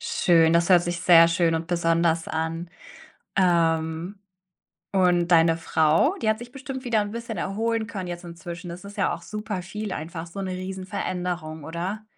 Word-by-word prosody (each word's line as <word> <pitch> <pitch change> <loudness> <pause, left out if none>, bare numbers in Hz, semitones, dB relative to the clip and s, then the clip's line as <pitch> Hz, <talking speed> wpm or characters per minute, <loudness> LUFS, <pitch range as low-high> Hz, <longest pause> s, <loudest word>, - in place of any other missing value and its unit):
Schön, 165 -2 +3
das 170 +1 +3
hört 180 -2 +6
sich 175 0 -3
sehr 170 -2 +7
schön 170 0 +2
und 165 0 -2
besonders 165 -1 +1
an. 160 +2 -3 0.7
Ähm, 170 0 +1 0.7
und 180 -3 +3
deine 165 -1 +5
Frau, 165 - +2
die 220 - 0
hat 220 +1 +1
sich 240 - -9
bestimmt 265 0 -7
wieder 235 -3 +2
'n 205 0 -6
bisschen 230 -1 -5
erholen 225 +3 -1
können 190 -5 -6
jetzt 175 0 -6
inzwischen. 170 +1 -8
Das 175 +3 -8
ist 200 +1 -10
ja 200 - +1
auch - - -10
super 210 -3 -5
viel 210 +2 -5
einfach, 165 +1 -5
so 195 +4 -8
'ne 190 - -3
Riesen-Veränderung, 180 -3 -4
oder? 180 +7 -4
175 Hz, 170 wpm, -25 LUFS, 165-205 Hz, 0.7 s, sehr